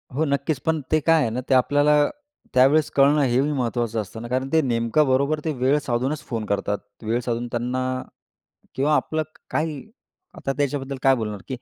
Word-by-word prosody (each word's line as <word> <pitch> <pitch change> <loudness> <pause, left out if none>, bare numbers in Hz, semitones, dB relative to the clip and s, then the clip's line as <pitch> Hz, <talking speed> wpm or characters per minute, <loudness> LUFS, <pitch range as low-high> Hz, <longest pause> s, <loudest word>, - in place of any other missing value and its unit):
हो, 155 +3 +1
नक्कीच. 140 0 -1
पण 160 -1 +1
ते 155 - +4
काय 165 +1 +3
आहे 115 - +1
ना 120 +3 -3
ते - - +4
आपल्याला 145 +3 +4 0.5
त्यावेळेस 135 +4 +4
कळणं 145 +2 +4
हे 125 -1 +2
बी 145 +2 0
महत्त्वाचं 120 -4 -1
असतं 110 +2 -9
ना, 120 - -6
कारण 130 +2 -1
ते 160 - +5
नेमकं 120 +3 +1
बरोबर 140 +4 +2
ते 160 - +1
वेळ 130 +2 +2
साधूनच 135 +2 -2
फोन 115 -4 -3
करतात. 100 0 -1 0.3
वेळ 115 +2 0
साधून 120 0 -2
त्यांना 125 +2 -2 0.9
किंवा 145 +3 +2
आपलं 155 0 -1
क 155 +1 -17
काही 155 -2 -2 0.6
आता 135 - -2
त्याच्याबद्दल 140 -1 -2
काय 135 0 +5
बोलणार 105 -3 -4
की 130 - -3
135 Hz, 190 wpm, -23 LUFS, 120-150 Hz, 0.9 s, ते